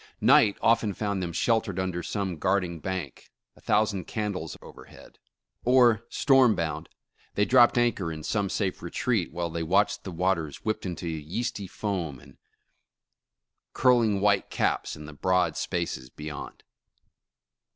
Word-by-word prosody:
Night 105 - +5
often 115 -3 +3
found 100 -3 -2
them 85 -1 -3
sheltered 110 0 0
under 95 -2 -2
some 95 -2 -3
guard 95 +2 +2
ing 85 -2 -6
bank, 90 -6 -5 0.3
a - - -20
thousand 105 -4 +1
candles 100 -7 -4
overhead; - - -15 0.4
or 120 -2 +4
storm 130 -5 +4
bound, 80 -2 -3 0.5
they 105 - +3
dropped 120 0 +5
anchor 115 -8 +1
in 80 -1 -7
some 100 +1 -1
safe 95 -2 -2
retreat, 100 +2 -1
while 85 0 -3
they, 85 - -3
watched 95 +6 +1
the - - -6
waters 85 -4 -1
whipped 110 -2 -2
into 90 -1 -5
yeasty 85 +6 -4
foam 90 - -4
and 70 0 -18 1.3
curl 125 -2 +4
ing 105 -3 +1
white 100 -1 +2
caps - - -1
in 75 - -10
the 75 - -10
broad 90 +1 +1
spaces 65 0 -3
beyond. 75 +1 -8
95 Hz, 145 wpm, -27 LUFS, 85-110 Hz, 1.3 s, Night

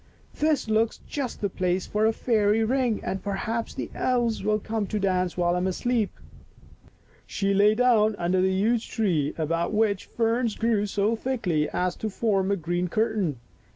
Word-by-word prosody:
This 305 -5 +1
looks 220 +1 +1
just 275 -4 -4
the 200 - 0
place 180 0 -1
for 215 +1 +1
a - - +3
fairy 220 -2 +2
ring 245 -1 0
and 190 - -3
perhaps 215 +3 -3
the - - -5
elves 240 -3 0
will 215 0 +2
come 215 -1 -3
to 215 - -2
dance 185 -2 0
while 175 -1 +2
I 180 - 0
am 180 - 0
asleep." 225 +3 0 1.2
She 200 0 0
lay 205 +2 +4
down 220 -3 +3
under 180 0 +1
the 190 - +3
huge 220 +5 +1
tree 170 - 0
about 165 +4 -1
which 210 -3 +1
ferns 230 0 0
grew 225 -3 +1
so 205 +3 +1
thickly 195 - -1
as 180 0 -1
to 220 - -3
form 195 -2 0
a 200 - +2
green 175 0 -2
curtain. 205 - 0
210 Hz, 175 wpm, -26 LUFS, 185-225 Hz, 1.2 s, lay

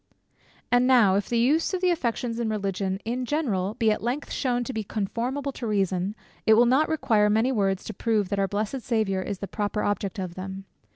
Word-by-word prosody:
And 245 +1 +4
now, 240 -7 +5
if 200 +1 0
the 235 - +1
use 300 +10 +2
of 365 - -4
the 365 -1 +3
affections 240 -6 -2
in 230 -2 -1
religion, 195 -2 -2
in 245 +3 -2
general, 225 -9 -1
be 220 -1 +2
at 210 - -1
length 250 +5 -3
shewn 245 -2 0
to 260 - -5
be 220 -1 -2
conformable 240 +8 -3
to 245 -3 -6
reason, 195 -1 0 0.3
it 220 - +7
will 235 +2 +6
not 265 +6 +3
require 220 -9 +2
many 220 +5 +2
words 195 -5 0
to - - -6
prove 210 -2 0
that 200 -1 -1
our 195 - +2
blessed 215 +6 -2
Saviour 215 -6 0
is 200 +1 -4
the 200 - -6
proper 210 +1 -2
object 205 +1 -1
of 185 -3 -4
them. 190 +1 -7
220 Hz, 215 wpm, -26 LUFS, 195-245 Hz, 0.3 s, it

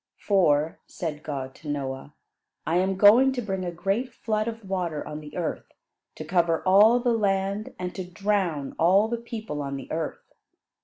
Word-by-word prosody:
"For," 160 -6 +2
said 155 -4 -5
God 135 -4 -5
to 150 - -10
Noah, 140 0 -4 0.5
"I 165 +3 +1
am 190 +1 +1
going 230 +7 +7
to 250 - -2
bring 190 -3 -3
a 180 - -2
great 200 +9 -1
flood 215 -1 -2
of 225 -3 -6
water 180 -5 -2
on 150 0 -6
the 150 +1 -10
earth 170 -3 -4 0.4
to 155 - -7
cover 170 0 +1
all 210 +6 +6
the 240 -1 +1
land 200 -1 -1
and 180 0 -4
to 190 - -5
drown 180 -6 -1
all 190 +6 +5
the 235 +1 -2
people 220 -10 -6
on 140 -1 -4
the 135 - -8
earth. 160 -1 -5
185 Hz, 175 wpm, -26 LUFS, 155-210 Hz, 0.5 s, going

